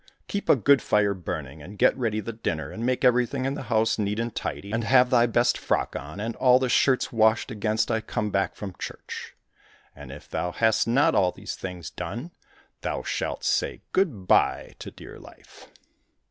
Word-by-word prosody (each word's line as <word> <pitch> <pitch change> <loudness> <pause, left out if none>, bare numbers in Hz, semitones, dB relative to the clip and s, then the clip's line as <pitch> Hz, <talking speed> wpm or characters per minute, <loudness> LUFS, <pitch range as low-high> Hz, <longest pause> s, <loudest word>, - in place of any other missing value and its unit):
Keep 200 - -4
a - - +8
good 140 +3 +4
fire 100 -1 +2
burning 90 -4 -6
and 100 +3 -11
get - - +4
ready 115 -4 -1
the 115 +3 -6
dinner, 85 -8 -3
and 115 - -6
make 130 +1 0
everything 125 +2 +2
in 135 - 0
the - - -5
house 110 -1 +2
neat 105 +1 -1
and 115 -1 -2
tidy, 100 - -5
and 115 +1 -1
have 125 +1 +4
thy 120 -1 +5
best 120 +1 +2
frock - - -1
on, 75 +8 -7
and 115 +2 -3
all 125 -1 +5
the 130 -1 0
shirts 130 0 +2
washed 110 +2 +3
against 110 +1 0
I 110 -1 0
come 105 -1 -3
back 100 0 0
from 100 -3 -7
church. - - -7 0.6
And 65 - -10
if 70 - -11
thou 90 - -3
hast 110 -1 +2
not 145 +7 +3
all 90 -2 +3
these - - -7
things 90 -3 -7
done, 120 - -6 0.5
thou - - -3
shalt - - -3
say - - 0
good 135 - 0
bye - - +2
to - - -7
dear - - -12
life." - - -16
115 Hz, 195 wpm, -25 LUFS, 100-125 Hz, 0.6 s, a